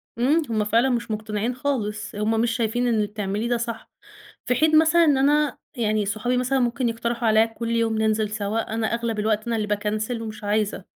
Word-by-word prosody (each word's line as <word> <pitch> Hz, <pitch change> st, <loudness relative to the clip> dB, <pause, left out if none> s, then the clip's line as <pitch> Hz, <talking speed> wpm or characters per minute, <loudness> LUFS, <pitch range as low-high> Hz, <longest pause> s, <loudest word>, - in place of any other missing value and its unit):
إمم. 275 Hz, +8 st, +2 dB
هم 215 Hz, -2 st, +1 dB
فعلًا 230 Hz, +5 st, +3 dB
مش 235 Hz, -3 st, -2 dB
مُقتنعين 215 Hz, +2 st, -2 dB
خالص، 215 Hz, -7 st, -3 dB
هم 220 Hz, +2 st, +1 dB
مش 235 Hz, 0 st, +1 dB
شايفين 240 Hz, +1 st, 0 dB
إن 235 Hz, -, +2 dB
اللي 210 Hz, -1 st, +1 dB
بتعمليه 210 Hz, +2 st, -3 dB
ده 240 Hz, -, +2 dB
صح. 230 Hz, -1 st, -5 dB, 0.6 s
في 250 Hz, -, +2 dB
حين 310 Hz, +4 st, +4 dB
مثلًا 335 Hz, +2 st, +5 dB
إن 290 Hz, -4 st, +3 dB
أنا 290 Hz, +1 st, +2 dB, 0.2 s
يعني 215 Hz, -3 st, 0 dB
صحابي 220 Hz, +5 st, -1 dB
مثلًا 255 Hz, +2 st, +1 dB
ممكن 245 Hz, +1 st, 0 dB
يقترحوا 235 Hz, 0 st, -1 dB
عليّا 220 Hz, +1 st, +5 dB
كل 230 Hz, +1 st, -5 dB
يوم 230 Hz, -1 st, +1 dB
ننزل 215 Hz, -1 st, +1 dB
سَوا، 215 Hz, +1 st, -2 dB
أنا 225 Hz, -1 st, 0 dB
أغلب 235 Hz, -2 st, -2 dB
الوقت 215 Hz, +1 st, 0 dB
أنا 230 Hz, -1 st, 0 dB
اللي 215 Hz, -, -1 dB
باكنسل 215 Hz, +3 st, -2 dB
ومش 215 Hz, -1 st, -7 dB
عايزة. 205 Hz, -2 st, -1 dB
225 Hz, 200 wpm, -23 LUFS, 215-245 Hz, 0.6 s, مثلًا